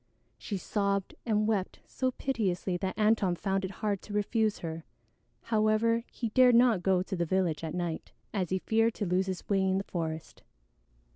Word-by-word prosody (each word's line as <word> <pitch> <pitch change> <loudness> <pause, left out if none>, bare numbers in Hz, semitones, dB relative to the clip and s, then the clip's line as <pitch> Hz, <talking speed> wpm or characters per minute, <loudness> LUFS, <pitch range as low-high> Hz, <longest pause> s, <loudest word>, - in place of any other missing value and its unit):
She 205 - -4
sobbed 200 0 -1
and 215 -1 +2
wept 205 -4 -1
so 260 - -1
piteously 200 -9 -1
that 190 +1 -3
Antone 210 -4 +3
found 195 +2 -1
it 190 - -2
hard 200 0 -2
to 210 - -9
refuse 215 +1 +1
her. 160 -1 -5 0.6
However, 225 +1 +2
he 230 - -3
dared 250 +1 +6
not 235 -5 +5
go 185 -1 +2
to 190 - -4
the 175 - 0
village 170 -2 0
at 160 +1 -4
night, 175 -2 -3 0.2
as 185 -5 -1
he 190 - +1
feared 225 +3 +1
to 205 - -2
lose 185 +1 +1
his 185 -2 -4
way 195 -2 +2
in 190 0 +2
the 195 - -1
forest. 160 -4 -5
195 Hz, 185 wpm, -30 LUFS, 180-220 Hz, 0.6 s, dared